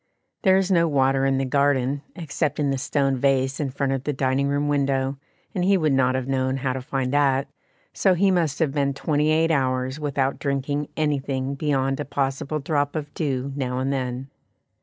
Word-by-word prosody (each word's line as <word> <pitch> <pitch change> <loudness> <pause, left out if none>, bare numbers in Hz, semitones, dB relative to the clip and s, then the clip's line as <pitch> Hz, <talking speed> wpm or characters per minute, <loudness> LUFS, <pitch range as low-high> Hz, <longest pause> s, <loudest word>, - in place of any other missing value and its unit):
There 190 -2 +5
is 195 0 +1
no 170 -2 +4
water 135 -2 +2
in 135 0 +2
the 135 - 0
garden, 140 0 +1
except 160 -3 -2
in 145 -2 +1
the 135 - -1
stone 135 -1 0
vase 135 0 +1
in 145 -3 -1
front 135 +1 -1
of 135 -1 -2
the 150 - -1
dining 135 +1 +1
room 145 +1 0
window, 135 -1 0 0.3
and 185 -4 -1
he 195 +1 +4
would 155 -5 +1
not 130 -1 +2
have 130 -1 -2
known 130 0 0
how 130 -1 -1
to 130 - -4
find 130 0 -2
that, 140 -1 +2 0.5
so 190 -2 +3
he 195 +2 +3
must 165 -6 +1
have 160 -4 +1
been 140 -1 0
twenty 150 +1 +1
eight 160 +1 +3
hours 130 -1 0
without 140 -2 -1
drinking 140 +1 -1
anything 140 -3 -1
beyond 135 -2 0
a - - -2
possible 140 +2 -2
drop 145 0 -1
of 145 -2 -4
dew 135 -3 -2
now 125 -3 -2
and 135 +2 0
then. 130 0 -3
140 Hz, 200 wpm, -24 LUFS, 135-150 Hz, 0.5 s, There